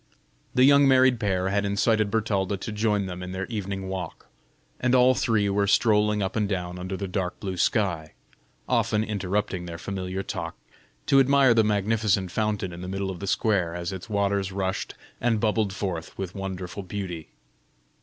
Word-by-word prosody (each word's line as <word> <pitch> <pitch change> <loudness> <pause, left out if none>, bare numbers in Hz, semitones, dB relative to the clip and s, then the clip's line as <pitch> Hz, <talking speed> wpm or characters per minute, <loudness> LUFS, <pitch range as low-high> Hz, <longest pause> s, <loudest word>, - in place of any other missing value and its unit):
The 125 - +5
young 140 +1 +6
married 130 -2 +5
pair 95 -3 0
had 100 +1 +1
incited 105 +1 +2
Bertalda 100 -3 0
to 105 - -6
join 105 -1 0
them 90 -1 -6
in 90 0 -6
their 95 +1 -3
evening 100 -3 -4
walk, 95 -3 -6 0.5
and 130 0 +2
all 125 0 +6
three 110 -5 +1
were 100 0 +1
strolling 105 -1 +3
up 95 - -3
and 105 -3 0
down 90 -2 -3
under 95 +1 -4
the 100 - -4
dark 90 -1 -3
blue 95 -3 -4
sky, 85 -4 0 0.5
often 105 0 +1
interrupting 100 -3 -2
their 85 -1 -6
familiar 95 +1 -4
talk 85 -5 -5 0.5
to 135 - +5
admire 135 -2 +5
the 115 -1 +4
magnificent 105 -2 +1
fountain 105 -4 -1
in 85 - -8
the 90 - -6
middle 95 +1 -3
of 90 - -8
the 100 - -5
square, 95 -5 +1
as 85 0 -3
its 95 +4 -8
waters 100 -1 0
rushed 95 0 -3 0.3
and 115 -2 +2
bubbled 105 -2 +1
forth 95 -4 -4
with 95 -2 -4
wonderful 95 0 -5
beauty. 90 -4 -6
100 Hz, 175 wpm, -26 LUFS, 95-110 Hz, 0.5 s, young